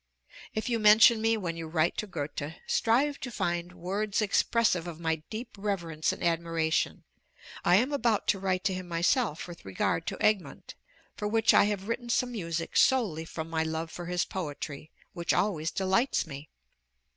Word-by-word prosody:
If 220 - -2
you 235 -2 0
mention 220 +1 +7
me 225 0 +2
when 175 -5 -3
you 165 -1 -6
write 160 +1 +1
to 215 - -2
Goethe, 150 -3 -5
strive 275 +6 +2
to 255 - -5
find 175 -5 -2
words 195 +4 -2
expressive 210 -3 +2
of 165 -2 -7
my 160 -1 0
deep 225 +3 -5
reverence 175 -6 -1
and - - -7
admiration. 165 -1 0 0.6
I 175 - +5
am 250 +9 +2
about 235 -6 +1
to 195 - +2
write 185 -1 -1
to 190 - +1
him 185 -1 -5
myself 175 - 0
with 175 -1 -11
regard 95 - -1
to 195 - -3
'Egmont,' 215 -3 0 0.4
for 210 - -3
which 225 +1 +3
I - - +6
have 205 -1 -2
written 240 +1 -3
some 245 +1 +1
music 170 -7 -3
solely 205 -12 +3
from 160 0 -6
my 165 -1 -1
love 160 0 -3
for 175 -1 -7
his 180 -1 0
poetry, 155 -3 -6 0.2
which 170 -2 -1
always 170 -6 0
delights 190 +7 +1
me. 145 -1 -9
185 Hz, 175 wpm, -29 LUFS, 165-215 Hz, 0.6 s, mention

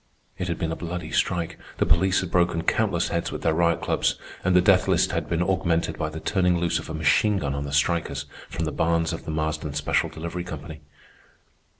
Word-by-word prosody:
It 90 - -2
had 85 - -2
been 80 -3 -2
a - - -2
bloody 85 -2 -5
strike. 85 0 0 0.2
The - - +2
police 95 +4 +3
had 90 -3 -5
broken 85 -2 +2
countless 95 -3 +1
heads 85 - -1
with - - -6
their 80 - +3
riot 85 0 +2
clubs; - - +1 0.3
and 95 0 +2
the - - +8
death 95 0 +4
list - - +3
had - - -2
been 85 +1 +1
augmented 90 -3 0
by 80 - -1
the 80 +1 -6
turning 90 0 +2
loose 85 -1 +1
of - - -9
a - - -4
machine 100 +6 +3
gun 70 -7 -2
on 70 0 -3
the 70 - -5
strikers 70 -1 0 0.2
from 80 - -3
the 80 - -2
barns 85 +2 +1
of 80 - -6
the - - -6
Marsden 80 -1 -2
Special 75 0 +1
Delivery 85 +2 -5
Company. 80 -2 -8
85 Hz, 220 wpm, -25 LUFS, 80-90 Hz, 0.3 s, the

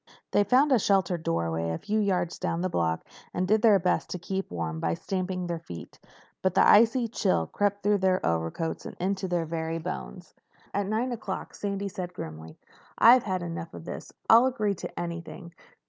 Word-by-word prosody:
They 205 - +4
found 260 +8 +4
a 255 - +5
sheltered 190 -4 +2
doorway 85 - -1
a 80 - -2
few 215 +1 -1
yards 185 -4 0
down 165 - -1
the 185 - 0
block 80 -1 0 0.3
and 180 +1 0
did 215 +2 +3
their 215 -3 +6
best 180 -1 0
to - - -3
keep 190 +2 -4
warm 80 -2 -3
by 85 +1 0
stamping 185 - -3
their 170 -1 -3
feet. 85 - -10 0.4
But 185 -1 0
the - - +6
icy 230 +3 +5
chill 85 - +1
crept 205 - -1
through 205 0 +3
their 185 -1 +2
overcoats 80 - -1
and - - -9
into 190 +1 -1
their 175 -2 0
very 160 0 -3
bones. 180 +2 -6 0.4
At 200 -1 0
nine 225 +5 0
o'clock 215 -5 -5
Sandy 200 0 -3
said 180 -2 -6
grimly, 80 - -8 0.4
"I've 245 +3 +8
had 185 -3 -1
enough 165 -1 -6
of - - -9
this. - - -7 0.2
I'll 235 +3 +7
agree 215 -6 0
to 190 - -7
anything. 170 0 -6
185 Hz, 190 wpm, -27 LUFS, 165-205 Hz, 0.4 s, I've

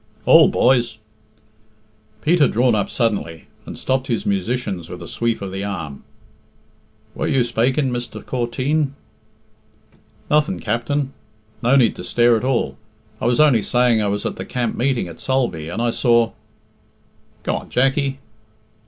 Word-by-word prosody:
"Hould, - - +7
boys!" 120 -3 +2 1.3
Pete 170 +3 +3
had 145 - +4
drawn 120 +1 +3
up 105 -2 0
suddenly, 100 -9 -2 0.2
and - - -7
stopped 130 0 -1
his 115 -3 -1
musicians 100 -2 -2
with - - -7
a - - -9
sweep 115 -3 -2
of 95 - -5
the 95 +1 -4
arm. 80 -9 -5 1.1
"Were - - -2
you 130 -2 +2
spaking, 125 +4 +1
Mr. 120 -3 -5
Corteen?" 135 +4 -1 1.3
"Nothing, 150 +5 +1
Capt'n. 130 +5 -2 0.5
No 125 +3 +3
need 120 -5 +4
to - - -7
stare 120 +6 +3
at 110 - -2
all. 130 -2 0 0.4
I - - -2
was 120 +2 +2
only 145 -7 +5
saying 120 -1 +2
I 105 - 0
was 100 +1 -2
at - - -3
the - - -4
camp 120 -2 -2
meeting 125 -6 0
at 85 - -10
Sulby, 120 -13 -1
and 90 - -4
I 120 - +1
saw 115 -2 +2 0.6
" - - -37
"Go - - -1
on, - - -9
Jackie." 135 +1 +1
120 Hz, 155 wpm, -20 LUFS, 110-135 Hz, 1.3 s, Hould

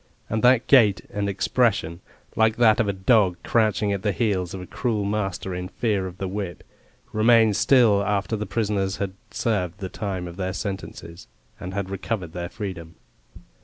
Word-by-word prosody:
And 110 0 0
that 125 0 +5
gait 110 -8 +5
and 100 0 -1
expression, 100 -4 0 0.4
like 110 0 +3
that 115 -3 +4
of 115 - +2
a - - +2
dog 95 -2 +3
crouching 105 -3 +1
at 100 - -3
the 105 - 0
heels 95 -6 -1
of - - -6
a - - -7
cruel 110 -1 -2
master 95 -2 -2
in 90 0 -4
fear 100 -2 -1
of 90 0 -10
the 95 - -3
whip, 95 -3 -5 0.5
remained 110 -1 +4
still 115 -6 +4
after 100 +1 -1
the 105 0 -4
prisoners 100 -3 -1
had 100 -2 -3 0.2
served 100 -6 -1
the 95 -2 -5
time 95 -4 -4
of 85 +1 -10
their 95 -1 -2
sentences, 95 -3 -6 0.3
and 95 +2 -6
had 100 -1 -3
recovered 95 -3 -4
their 85 -1 -5
freedom. 90 -6 -7
100 Hz, 175 wpm, -24 LUFS, 95-110 Hz, 0.5 s, that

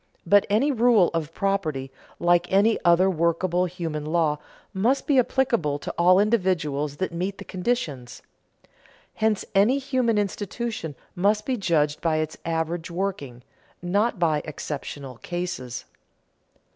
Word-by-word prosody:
But 200 +3 +4
any 235 +9 +3
rule 235 -7 +4
of 165 -2 -2
property, 160 -10 -2 0.3
like 175 0 +2
any 205 +4 +4
other 175 +2 +5
workable 175 +1 +1
human 165 -4 -4
law, 155 -1 +1 0.3
must 230 +8 +1
be 280 -3 +4
applicable 235 - +1
to - - -6
all 180 +2 +5
individuals 175 -9 0
that 185 - -2
meet 185 +3 -3
the 200 - -9
conditions. 170 - -3 0.9
Hence 220 -2 0
any 210 +7 +4
human 255 -5 0
institution 205 - -3 0.2
must 210 +3 +1
be 260 - 0
judged 155 -8 0
by 165 -2 +1
its 155 0 -2
average 165 +1 -2
working, 170 -10 -4 0.4
not 205 +6 0
by 160 -4 +1
exceptional 140 -3 -6
cases. 175 -8 -5
180 Hz, 130 wpm, -25 LUFS, 155-205 Hz, 0.9 s, other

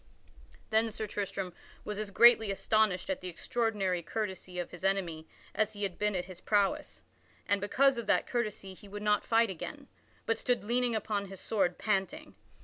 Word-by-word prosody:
Then 220 +1 +3
Sir 220 0 -4
Tristram 195 -3 -4 0.3
was 210 -1 -4
as 215 -1 -3
greatly 225 +1 +6
astonished 200 -1 +1
at 190 - -3
the 185 - -5
extraordinary 195 -1 -1
courtesy 185 -2 -4
of 175 - -3
his 175 - -10
enemy 175 -5 -1 0.3
as 215 0 +1
he 205 0 -5
had 195 -3 -2
been 210 -1 +1
at 180 -1 -1
his 185 -2 -11
prowess. 205 -2 0 0.4
And 200 -2 +2
because 265 +5 +3
of 230 - -6
that - - +3
courtesy 215 -5 -3
he 205 +2 -14
would 205 +1 -7
not 210 -1 +3
fight 230 -2 +4
again, 280 - -7 0.4
but 225 - 0
stood 245 -3 0
leaning 240 +2 +1
upon 205 -2 -1
his 195 -1 -9
sword 190 -5 0
panting. 215 +10 -1
205 Hz, 180 wpm, -31 LUFS, 190-225 Hz, 0.4 s, greatly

